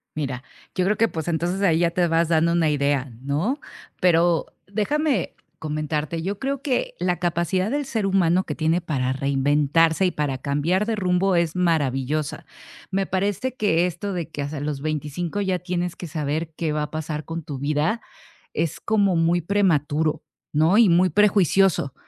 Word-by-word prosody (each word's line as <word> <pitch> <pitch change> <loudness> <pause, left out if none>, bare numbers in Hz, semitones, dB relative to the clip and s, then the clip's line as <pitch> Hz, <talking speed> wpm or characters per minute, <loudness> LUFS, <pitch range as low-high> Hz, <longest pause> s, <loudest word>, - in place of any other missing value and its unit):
Mira, 135 -4 -3 0.3
yo 180 - +1
creo 210 +2 +1
que, 225 - +4
pues, 160 -6 -5
entonces 175 +3 -1
ahí 165 -5 +3
ya 170 -1 +2
te 175 0 +1
vas 165 0 +2
dando 165 0 +3
una 165 -2 +2
idea, 140 -2 0
¿no?, 155 - -1 0.4
pero 170 -2 +3 0.2
déjame 255 - 0 0.2
comentarte, 155 +1 -2
yo 195 +4 -3
creo 275 0 -2
que 270 -3 -1
la 180 0 0
capacidad 175 +2 0
del 290 +3 -1
ser 225 -5 -2
humano 185 -2 +2
que - - -4
tiene 160 +2 +1
para 140 -7 -1
reinventarse 145 +5 +2
y 180 - +2
para 145 -4 -2
cambiar 145 +9 0
de 225 0 -1
rumbo 185 -1 +1
es 170 -2 +1
maravillosa, 150 -4 0 0.5
me 195 0 0
parece 200 +7 -1
que 180 -7 +2
esto 180 +3 -3
de 170 -3 -4
que 150 - -5
hasta 145 +1 -4
los 145 -1 -3
25 155 +5 -3
ya 190 -2 0
tienes 180 -1 -3
que 175 - -6
saber 155 +1 -3
qué 160 -2 -2
va 150 0 -1
a 150 - -6
pasar 155 -1 -4
con 165 0 -5
tu 145 -3 -6
vida, 150 - 0 0.5
es 165 0 -2
como 200 -3 +2
muy 165 +1 +2
prematuro, 160 -5 +1 0.3
¿no?, 160 +6 +4
y 225 -5 +6
muy 180 +2 +4
prejuicioso, 195 -7 +3
170 Hz, 175 wpm, -23 LUFS, 150-190 Hz, 0.5 s, y